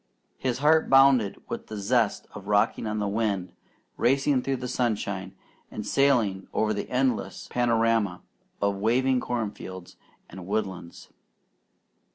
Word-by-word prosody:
His 130 Hz, -2 st, -1 dB
heart 155 Hz, +3 st, +3 dB
bounded 135 Hz, -6 st, +5 dB
with -, -, -6 dB
the 110 Hz, -, -6 dB
zest 110 Hz, +1 st, +1 dB
of 100 Hz, -1 st, -10 dB
rocking 105 Hz, +1 st, +1 dB
on 110 Hz, 0 st, -2 dB
the 105 Hz, -1 st, -1 dB
wind, 100 Hz, -3 st, -1 dB, 0.4 s
racing 135 Hz, +2 st, +2 dB
through 135 Hz, +1 st, -1 dB
the 125 Hz, 0 st, -5 dB
sunshine, 100 Hz, -6 st, -2 dB, 0.3 s
and -, -, -6 dB
sailing 120 Hz, -9 st, +2 dB
over 110 Hz, 0 st, +1 dB
the 100 Hz, -, -4 dB
endless 125 Hz, -2 st, -1 dB
panorama 115 Hz, -5 st, +1 dB, 0.4 s
of 100 Hz, -1 st, +1 dB
waving 125 Hz, +5 st, +2 dB
corn 120 Hz, -4 st, -2 dB
fields, 95 Hz, -3 st, -10 dB, 0.3 s
and 95 Hz, -2 st, -10 dB
woodlands. 95 Hz, -5 st, -4 dB
110 Hz, 135 wpm, -26 LUFS, 100-125 Hz, 0.4 s, bounded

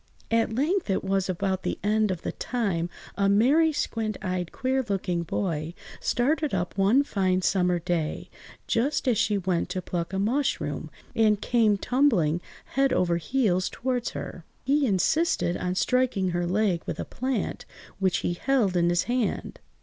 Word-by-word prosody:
At 225 Hz, -1 st, +2 dB
length 320 Hz, -, 0 dB
(it 190 Hz, -, 0 dB
was 195 Hz, 0 st, 0 dB
about 190 Hz, +1 st, -1 dB
the -, -, -2 dB
end 215 Hz, +1 st, +2 dB
of 180 Hz, -3 st, -3 dB
the -, -, -2 dB
time) 195 Hz, -9 st, -2 dB, 0.3 s
a 200 Hz, -1 st, +2 dB
merry, 275 Hz, +11 st, +4 dB
squint–eyed, 210 Hz, -, -2 dB
queer–looking 205 Hz, -9 st, -1 dB
boy 165 Hz, -1 st, -2 dB, 0.2 s
started 285 Hz, +1 st, +1 dB
up 175 Hz, -1 st, -2 dB
one 205 Hz, +8 st, +4 dB
fine 185 Hz, -7 st, 0 dB
summer 180 Hz, -2 st, +2 dB
day, 170 Hz, -2 st, -2 dB, 0.4 s
just 265 Hz, +4 st, 0 dB
as 235 Hz, -5 st, +3 dB
she 205 Hz, -1 st, +2 dB
went 180 Hz, -3 st, -1 dB
to 185 Hz, -, -2 dB
pluck 170 Hz, 0 st, -3 dB
a 190 Hz, -, -2 dB
mushroom, 245 Hz, +8 st, -1 dB, 0.3 s
and 215 Hz, -2 st, +3 dB
came 220 Hz, -4 st, +2 dB
tumbling, 195 Hz, -, +2 dB, 0.3 s
head 270 Hz, +1 st, +3 dB
over 175 Hz, -2 st, +2 dB
heels, 185 Hz, -2 st, +1 dB
towards 250 Hz, -1 st, -2 dB
her. 175 Hz, -, -7 dB, 0.2 s
He 280 Hz, +1 st, +2 dB
insisted 205 Hz, -, +1 dB
on 180 Hz, 0 st, -2 dB
striking 235 Hz, -2 st, +1 dB
her 175 Hz, 0 st, -1 dB
leg 185 Hz, -2 st, +1 dB
with -, -, -4 dB
a -, -, -3 dB
plant 255 Hz, -5 st, -3 dB, 0.3 s
which 190 Hz, -2 st, +2 dB
he 175 Hz, -, +1 dB
held 215 Hz, -1 st, +1 dB
in 170 Hz, -1 st, +3 dB
his 175 Hz, 0 st, +2 dB
hand. 245 Hz, -2 st, -2 dB
200 Hz, 155 wpm, -26 LUFS, 180-250 Hz, 0.4 s, merry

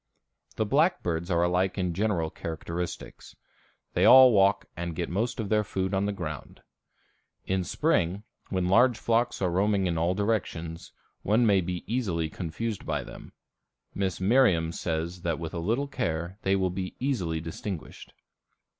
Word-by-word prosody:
The 110 Hz, -, 0 dB
blackbirds 100 Hz, -, +1 dB
are 85 Hz, -1 st, +2 dB
alike 90 Hz, +2 st, +1 dB
in 90 Hz, -2 st, -1 dB
general 90 Hz, -4 st, 0 dB
characteristics. 85 Hz, +1 st, -6 dB, 0.6 s
They -, -, +1 dB
all 130 Hz, -1 st, +9 dB
walk 100 Hz, -1 st, +3 dB
and 85 Hz, -1 st, -4 dB
get 85 Hz, +1 st, -3 dB
most 110 Hz, +7 st, -1 dB
of 105 Hz, -3 st, -3 dB
their 105 Hz, -1 st, +3 dB
food 95 Hz, -1 st, -3 dB
on 95 Hz, +1 st, +1 dB
the -, -, 0 dB
ground. 80 Hz, -8 st, -7 dB, 0.8 s
In 95 Hz, -1 st, 0 dB
spring, 95 Hz, -, 0 dB, 0.3 s
when 95 Hz, -1 st, 0 dB
large 120 Hz, +5 st, +4 dB
flocks 115 Hz, -3 st, 0 dB
are 90 Hz, -, +1 dB
roaming 100 Hz, +2 st, +2 dB
in 85 Hz, -2 st, 0 dB
all 85 Hz, +3 st, +1 dB
directions, 90 Hz, -6 st, -2 dB, 0.3 s
one 110 Hz, +4 st, +2 dB
may 100 Hz, -3 st, +4 dB
easily 90 Hz, -1 st, -2 dB
be -, -, -18 dB
confused 100 Hz, +5 st, -4 dB
by -, -, -2 dB
them. -, -, -12 dB, 0.6 s
Miss 95 Hz, -3 st, -2 dB
Merriam 95 Hz, -6 st, +3 dB
says 85 Hz, +1 st, -3 dB
that 85 Hz, -3 st, -1 dB
with 80 Hz, -1 st, -6 dB
a 85 Hz, -, -3 dB
little 115 Hz, +11 st, 0 dB
care 85 Hz, -, -3 dB
they 95 Hz, +1 st, +2 dB
will 95 Hz, -2 st, 0 dB, 0.2 s
easily 105 Hz, -12 st, -1 dB
be 80 Hz, -, -5 dB
distinguished. 85 Hz, +1 st, -7 dB
95 Hz, 155 wpm, -27 LUFS, 85-105 Hz, 0.8 s, all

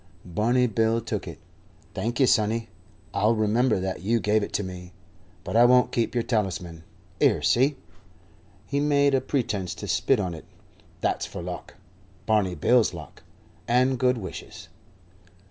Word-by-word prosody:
Barney 115 Hz, +8 st, +1 dB
Bill 115 Hz, 0 st, +1 dB
took -, -, -4 dB
it. -, -, -8 dB, 0.6 s
"Thank 120 Hz, +4 st, -3 dB
'ee, 135 Hz, -, +6 dB
sonny. 115 Hz, -2 st, +1 dB, 0.4 s
I'll 105 Hz, +3 st, +2 dB
remember 110 Hz, +1 st, +2 dB
that 95 Hz, -1 st, -4 dB
you 115 Hz, +5 st, +1 dB
gave 105 Hz, 0 st, +2 dB
it 100 Hz, -, -4 dB
to 105 Hz, -, 0 dB
me. 90 Hz, -1 st, -8 dB, 0.5 s
But -, -, -5 dB
I 120 Hz, -, +7 dB
won't 125 Hz, 0 st, +4 dB
keep 115 Hz, +1 st, -1 dB
yer 120 Hz, -, +1 dB
talisman. 90 Hz, -8 st, -2 dB, 0.4 s
'Ere, -, -, +3 dB
see 135 Hz, +4 st, +3 dB, 0.5 s
" -, -, -30 dB
he 140 Hz, -, -1 dB
made 145 Hz, -1 st, +3 dB
a 135 Hz, -, +3 dB
pretence 105 Hz, -, -2 dB
to -, -, -7 dB
spit 135 Hz, -4 st, +2 dB
on 90 Hz, -4 st, -2 dB
it 80 Hz, -, -10 dB, 0.6 s
"that's -, -, -1 dB
for -, -, -7 dB
luck. -, -, -7 dB, 0.5 s
Barney 105 Hz, -5 st, +1 dB
Bill's 120 Hz, +9 st, +3 dB
luck, -, -, -11 dB, 0.5 s
and 125 Hz, +1 st, +2 dB
good 125 Hz, 0 st, +2 dB
wishes." 95 Hz, -5 st, -9 dB
115 Hz, 160 wpm, -25 LUFS, 100-125 Hz, 0.6 s, I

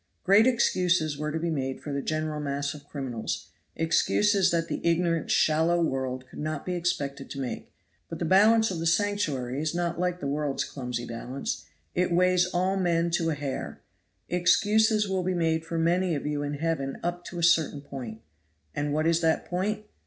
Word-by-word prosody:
Great 200 Hz, +5 st, +6 dB
excuses 180 Hz, -, +2 dB
were 150 Hz, +1 st, -3 dB
to 160 Hz, -, -2 dB
be 165 Hz, +1 st, -1 dB
made 135 Hz, -3 st, -2 dB
for 145 Hz, -, -6 dB
the 140 Hz, -, -1 dB
general 155 Hz, +1 st, -2 dB
mass 140 Hz, 0 st, -2 dB
of 145 Hz, -1 st, -13 dB
criminals; 130 Hz, -6 st, -4 dB, 0.3 s
excuses 195 Hz, +4 st, +3 dB
that 165 Hz, -1 st, 0 dB
the -, -, -3 dB
ignorant, 170 Hz, -1 st, +1 dB
shallow 160 Hz, +3 st, +3 dB
world 130 Hz, -5 st, -1 dB
could -, -, -11 dB
not 155 Hz, -1 st, -3 dB
be 180 Hz, -, -2 dB
expected 140 Hz, -6 st, -2 dB
to 140 Hz, -, -6 dB
make; 130 Hz, -2 st, -5 dB, 0.4 s
but 165 Hz, -, -5 dB
the 170 Hz, -, -2 dB
balance 215 Hz, +5 st, +5 dB
of 175 Hz, -, -3 dB
the 165 Hz, -, -1 dB
Sanctuary 165 Hz, -9 st, 0 dB
is 155 Hz, +1 st, -2 dB
not 170 Hz, -1 st, -1 dB
like 180 Hz, 0 st, 0 dB
the -, -, -6 dB
world's 145 Hz, 0 st, -1 dB
clumsy 125 Hz, -3 st, -5 dB
balance; 120 Hz, +3 st, -5 dB, 0.3 s
it 180 Hz, 0 st, +1 dB
weighs 180 Hz, +1 st, +3 dB
all 185 Hz, +2 st, 0 dB
men 170 Hz, -2 st, +1 dB
to 165 Hz, -1 st, +1 dB
a 155 Hz, -, 0 dB
hair. 140 Hz, -2 st, -5 dB, 0.5 s
Excuses 210 Hz, +4 st, +3 dB
will 190 Hz, -1 st, 0 dB
be 185 Hz, 0 st, -1 dB
made 160 Hz, -1 st, +1 dB
for 165 Hz, 0 st, -4 dB
many 170 Hz, +1 st, +2 dB
of 145 Hz, -, -4 dB
you 150 Hz, -1 st, -1 dB
in 145 Hz, 0 st, -3 dB
heaven 145 Hz, -3 st, -2 dB
up 175 Hz, +1 st, -2 dB
to 175 Hz, -, -7 dB
a 170 Hz, -, -2 dB
certain 160 Hz, -4 st, +3 dB
point. 125 Hz, -6 st, -8 dB, 0.5 s
And 145 Hz, 0 st, -1 dB
what 155 Hz, +1 st, +1 dB
is 165 Hz, 0 st, +3 dB
that 160 Hz, -1 st, +1 dB
point? 210 Hz, +4 st, -2 dB
165 Hz, 190 wpm, -27 LUFS, 145-180 Hz, 0.5 s, Great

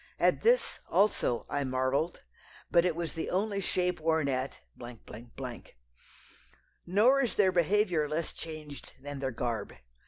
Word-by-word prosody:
At -, -, +3 dB
this, 485 Hz, +2 st, +3 dB
also, 195 Hz, -, +2 dB
I 145 Hz, -, -1 dB
marvelled; 130 Hz, +5 st, -1 dB, 0.5 s
but 170 Hz, 0 st, +5 dB
it 175 Hz, -3 st, +1 dB
was 170 Hz, -1 st, -3 dB
the 165 Hz, -, -3 dB
only 200 Hz, +2 st, 0 dB
shape 180 Hz, -1 st, 0 dB
worn 160 Hz, -2 st, +1 dB
at. 130 Hz, 0 st, -2 dB, 2.3 s
Nor 230 Hz, +10 st, +5 dB
is 245 Hz, -, -1 dB
their 190 Hz, -3 st, +4 dB
behaviour 175 Hz, -3 st, +2 dB
less 155 Hz, +1 st, -2 dB
changed 155 Hz, -3 st, -9 dB
than 145 Hz, +1 st, -7 dB
their 135 Hz, -1 st, -1 dB
garb. 115 Hz, -3 st, -3 dB
165 Hz, 130 wpm, -30 LUFS, 140-190 Hz, 2.3 s, but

